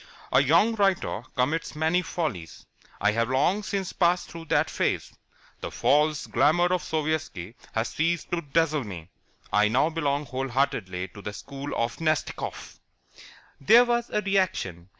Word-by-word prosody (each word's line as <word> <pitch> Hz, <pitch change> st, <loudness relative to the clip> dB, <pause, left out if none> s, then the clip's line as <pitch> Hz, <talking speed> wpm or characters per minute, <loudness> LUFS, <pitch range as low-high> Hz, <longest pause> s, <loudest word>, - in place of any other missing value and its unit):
A 130 Hz, -, +5 dB
young 165 Hz, -, +4 dB
writer 195 Hz, -, +1 dB
commits 145 Hz, +6 st, -1 dB
many 160 Hz, +4 st, +2 dB
follies. 150 Hz, -, -4 dB, 0.3 s
I 105 Hz, +1 st, +3 dB
have 115 Hz, +2 st, 0 dB
long 150 Hz, +10 st, +2 dB
since 195 Hz, -2 st, -3 dB
passed 175 Hz, 0 st, +1 dB
through 165 Hz, -1 st, -8 dB
that -, -, +2 dB
phase. -, -, -1 dB, 0.5 s
The -, -, -5 dB
false 150 Hz, +1 st, +2 dB
glamour 175 Hz, +5 st, +3 dB
of 180 Hz, -, +1 dB
Sovietski 155 Hz, -, -3 dB, 0.2 s
has 110 Hz, +1 st, -1 dB
ceased 165 Hz, +1 st, -1 dB
to 175 Hz, -1 st, 0 dB
dazzle 155 Hz, -1 st, +1 dB
me. 90 Hz, -5 st, -9 dB, 0.4 s
I 105 Hz, +1 st, +5 dB
now 130 Hz, +9 st, +2 dB
belong 145 Hz, -2 st, -1 dB
whole 130 Hz, +1 st, -3 dB
heartedly 110 Hz, -9 st, -1 dB
to 100 Hz, -, -12 dB
the 105 Hz, -, -6 dB
school 140 Hz, +6 st, -7 dB
of 115 Hz, 0 st, -1 dB
Nastikoff." 155 Hz, -1 st, -3 dB, 0.8 s
There 230 Hz, -, +6 dB
was 240 Hz, 0 st, 0 dB
a 210 Hz, -, 0 dB
reaction. 170 Hz, -, -1 dB
150 Hz, 150 wpm, -26 LUFS, 115-170 Hz, 0.8 s, There